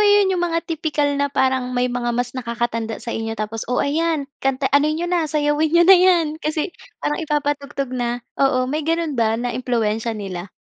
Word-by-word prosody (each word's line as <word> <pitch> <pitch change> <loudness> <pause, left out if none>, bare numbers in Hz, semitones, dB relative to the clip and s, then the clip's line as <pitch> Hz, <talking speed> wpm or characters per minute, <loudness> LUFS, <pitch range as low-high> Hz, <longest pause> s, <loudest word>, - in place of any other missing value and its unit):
'yon, 410 -2 +5
'yong 360 - 0
mga 335 0 -1
tipikal 310 -3 -1
na 285 0 0
parang 260 -2 0
may 245 0 +1
mga 240 -1 -2
mas 245 0 -1
nakakatanda 235 -2 -3
sa 235 - -3
inyo 225 0 -3
tapos, 215 +1 -4
"Oh, 250 - 0
ayan, 315 +1 +1 0.2
kanta 270 0 0
ano 285 +2 +4
niyo 315 +3 -1
na, 345 -3 0
sayawin 295 0 +1
niyo 340 +2 +5
na 385 - +8
'yan." 360 -3 +5
Kasi, 310 +3 -2 0.3
parang 295 - 0
ipapatugtog 290 -3 -2
na, 245 -1 -2 0.2
oo. 260 -2 +3
May 290 +5 -2
ganon 330 0 -1
ba 225 0 +2
na 240 +1 -2
impluwensya 230 -2 -1
nila? 190 -3 -6
280 Hz, 190 wpm, -21 LUFS, 240-315 Hz, 0.3 s, na